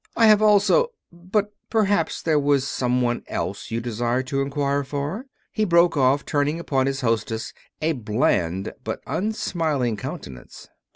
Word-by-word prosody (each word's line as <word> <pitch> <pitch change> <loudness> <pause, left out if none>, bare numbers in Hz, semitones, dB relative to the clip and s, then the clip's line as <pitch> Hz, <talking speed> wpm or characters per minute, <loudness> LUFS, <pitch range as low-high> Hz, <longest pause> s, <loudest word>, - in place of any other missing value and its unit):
I 230 - +6
have 215 -1 +6
also 215 - +4 0.2
But 200 +4 -2 0.2
perhaps 205 -7 +1
there 155 -2 +3
was 140 -1 +2
some 125 -1 0
one 120 0 0
else - - -4
you 115 - -2
desired 120 +2 -1
to 135 0 0
inquire 140 0 0
for," 145 - -4 0.2
he 215 - 0
broke 170 -3 +4
off, 135 0 +2
turning 145 +2 0
upon 135 -5 0
his 135 0 -2
hostess 115 -2 -1 0.3
a 160 - +2
bland 105 - 0
but - - -4
unsmiling 160 - -1
countenance. 65 -9 -8
140 Hz, 150 wpm, -23 LUFS, 125-175 Hz, 0.3 s, I